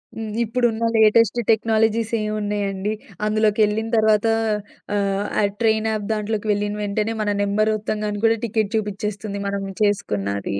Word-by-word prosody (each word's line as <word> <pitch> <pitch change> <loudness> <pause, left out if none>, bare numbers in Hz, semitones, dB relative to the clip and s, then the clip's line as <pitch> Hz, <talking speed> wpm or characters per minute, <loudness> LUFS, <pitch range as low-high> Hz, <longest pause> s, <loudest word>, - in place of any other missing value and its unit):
హ్మ్. 225 -1 -5
ఇప్పుడున్న 230 0 0
latest 220 +1 +4
technologies 225 0 +1
ఏమున్నాయండి? 205 -1 -2 0.3
అందులోకెళ్ళిన 215 0 +2
తర్వాత 215 0 +3 0.7
ఆహ్, 200 0 0 0.2
ఆ - - +2 0.2
ట్రైన్ 220 -1 +2
యాప్ 210 -2 -3
దాంట్లోకి 215 0 -2
వెళ్ళిన 205 0 -2
వెంటనే 210 +2 -1
మన 210 - 0
నంబర్ 215 +2 +1
ఒత్తంగానే 210 -1 -3
కూడా 225 0 +4
టికెట్ 220 -1 -1
చూపిచ్చేస్తుంది 205 0 -4
మనం 200 0 -2 0.2
చేసుకున్నాది. 100 - -1
215 Hz, 125 wpm, -22 LUFS, 205-220 Hz, 0.7 s, latest